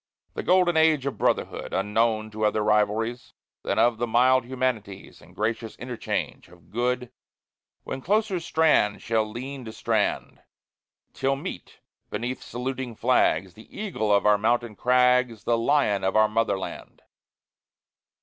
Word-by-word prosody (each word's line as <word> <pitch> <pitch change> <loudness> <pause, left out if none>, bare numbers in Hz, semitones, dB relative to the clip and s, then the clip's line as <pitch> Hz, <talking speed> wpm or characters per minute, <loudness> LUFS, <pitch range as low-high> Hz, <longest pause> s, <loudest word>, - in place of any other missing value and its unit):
The - - -4
golden 180 -2 +3
age 160 -4 +3
of 140 - -4
brotherhood - - -1
Unknown 110 +2 0
to 110 0 -4
other 105 0 +2
rivalries 105 +3 0 0.3
Than - - -2
of 120 -1 +3
the 120 - -1
mild 130 +2 +3
humanities, 120 -6 -4
And 90 +3 -18
gracious 110 +1 -2
interchange 125 -1 -4
of 85 0 -20
good, 125 +1 -1 0.7
When 135 - -5
closer 205 +2 +1
strand 160 -11 +2
shall 110 -2 0
lean 130 +4 -7
to 110 - -7
strand, - - -1 0.7
Till 135 +1 0
meet, 135 - -8 0.3
beneath 125 +2 -4
saluting 125 -1 -5
flags, 95 -7 +2
The 110 - -13
eagle 180 - -2
of 100 0 +3
our 105 -1 +5
mountain 120 0 0
crags, 125 -1 +2
The 120 - +2
lion 115 -4 +1
of 95 +2 0
our 110 0 +5
Motherland! 105 -3 -3
120 Hz, 140 wpm, -25 LUFS, 105-130 Hz, 0.7 s, our